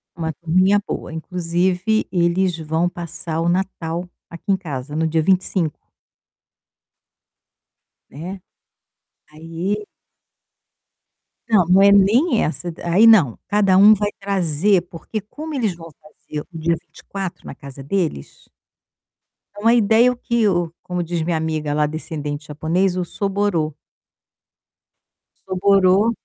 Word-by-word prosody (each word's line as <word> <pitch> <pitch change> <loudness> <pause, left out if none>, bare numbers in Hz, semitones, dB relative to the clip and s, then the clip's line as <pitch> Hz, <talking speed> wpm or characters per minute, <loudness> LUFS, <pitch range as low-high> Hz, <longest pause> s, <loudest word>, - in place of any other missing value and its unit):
Uma 160 -2 -3
turminha 185 +6 +2
boa, - - -5
inclusive, 180 +5 -1
eles 175 0 +1
vão 160 +2 -1
passar 170 -2 -5
o 170 - +1
Natal 175 -1 -2 0.2
aqui 170 - -12
em 195 - +3
casa, 145 -5 -6
no 160 +1 +1
dia 160 0 +1
25. 185 -2 0 2.3
Né, 180 +7 -8 0.9
aí 165 +7 -4 1.6
Não, 210 -6 +4
não 185 +3 +4
é 200 0 +7
nem 220 - +4
essa. 175 +2 -3
Aí 175 +6 +4
não, 180 - +5
cada 200 -2 +3
um 205 +3 +8
vai 205 0 0
trazer 190 -1 +1
porque 195 +6 -6
como 305 +10 -8
eles 225 -10 -1
vão 165 0 -11
fazer 150 0 -8
o 165 - -9
dia 165 +1 +1
24 195 -3 -8
na - - -8
casa 140 -1 -11
deles 160 - -3 1.1
é - - -7
uma 230 +2 +4
ideia 235 +2 +4
que 235 -2 0
o 175 -4 0
como 180 -1 -3
diz 170 0 -3
minha 165 +1 0
amiga 155 -2 -2
lá 150 0 +2
descendente 150 -1 -5
japonês, 175 +5 0
o 180 - 0
soborō 195 -4 -1 1.8
soborō 195 +2 +3
180 Hz, 125 wpm, -20 LUFS, 160-200 Hz, 2.3 s, um